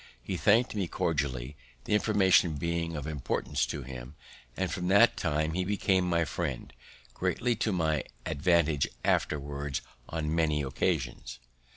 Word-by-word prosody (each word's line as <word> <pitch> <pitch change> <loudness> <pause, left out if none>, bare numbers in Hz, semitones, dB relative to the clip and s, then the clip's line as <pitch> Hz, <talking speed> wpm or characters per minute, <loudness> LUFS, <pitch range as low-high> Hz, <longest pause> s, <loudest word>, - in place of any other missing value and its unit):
He 95 - -3
thank'd 110 +7 +3
me 100 -4 -1
cordially, 70 -5 -2 0.3
the - - -2
information 95 -6 +4
being 85 +2 -2
of 75 -2 -4
importance 75 -1 -1
to 70 - -4
him; 60 -1 -9 0.4
and 95 -2 -1
from 90 0 -2
that 100 +5 +6
time 80 -1 0
he 90 +1 0
became 95 -2 +1
my 85 -1 +2
friend, 75 -4 -4 0.4
greatly 120 0 0
to 110 -1 0
my 80 -5 0 0.2
advantage 80 -2 +2 0.2
afterwards 70 -1 -1 0.3
on 80 -1 -2
many 75 -3 +1
occasions. 65 -4 -2
80 Hz, 140 wpm, -29 LUFS, 70-90 Hz, 0.4 s, that